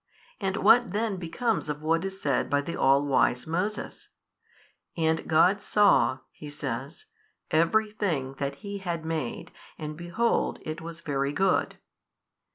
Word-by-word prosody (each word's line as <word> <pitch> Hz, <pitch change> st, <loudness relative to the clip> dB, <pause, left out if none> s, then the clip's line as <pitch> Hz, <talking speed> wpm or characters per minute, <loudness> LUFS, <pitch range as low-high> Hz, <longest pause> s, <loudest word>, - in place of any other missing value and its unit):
And 195 Hz, 0 st, -1 dB
what 235 Hz, -4 st, +5 dB
then 215 Hz, -2 st, -1 dB
becomes 195 Hz, +3 st, -1 dB
of 150 Hz, +1 st, -4 dB
what 165 Hz, +2 st, +1 dB
is 195 Hz, 0 st, -5 dB
said 140 Hz, -7 st, 0 dB
by 145 Hz, 0 st, +2 dB
the 170 Hz, +4 st, -5 dB
all 140 Hz, +2 st, +4 dB
wise 130 Hz, -3 st, +2 dB
Moses, 180 Hz, +7 st, -3 dB, 0.9 s
And 160 Hz, -1 st, +1 dB
God 180 Hz, +5 st, +4 dB
saw 130 Hz, -, +3 dB
(he 150 Hz, -, -10 dB
says) 140 Hz, -, -5 dB, 0.5 s
every 210 Hz, +7 st, +3 dB
thing 160 Hz, -11 st, -2 dB
that 140 Hz, 0 st, -2 dB
He 200 Hz, 0 st, -4 dB
had 170 Hz, -4 st, -4 dB
made, 160 Hz, -7 st, -4 dB, 0.3 s
and 155 Hz, 0 st, -5 dB
behold 175 Hz, +8 st, 0 dB
it 155 Hz, +1 st, -5 dB
was 170 Hz, 0 st, -8 dB
very 140 Hz, -3 st, -1 dB
good? 190 Hz, +4 st, +1 dB
165 Hz, 145 wpm, -27 LUFS, 145-195 Hz, 0.9 s, what